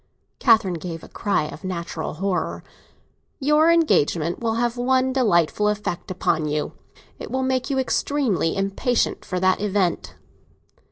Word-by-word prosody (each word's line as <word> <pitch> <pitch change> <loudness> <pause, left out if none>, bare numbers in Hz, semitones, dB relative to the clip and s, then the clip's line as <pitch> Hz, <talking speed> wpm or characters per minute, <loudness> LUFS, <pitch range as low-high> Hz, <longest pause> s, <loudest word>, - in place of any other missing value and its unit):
Catherine 215 -8 +3
gave 165 -1 -6
a - - -10
cry 200 -7 -1
of 150 - -8
natural 170 -4 -4
horror. 185 +2 -2 0.8
"Your 300 +3 +4
engagement 175 - +2
will 225 -1 -1
have 240 0 0
one 260 +1 +1
delightful 210 - +2
effect 210 -4 -2
upon 160 -4 0
you; 150 0 -2 0.5
it - - -7
will 260 0 -1
make 260 0 0
you 275 - 0
extremely 260 - 0
impatient 195 +6 0
for 185 - -3
that 185 +2 +2
event." 195 -4 -1
205 Hz, 135 wpm, -23 LUFS, 175-255 Hz, 0.8 s, Your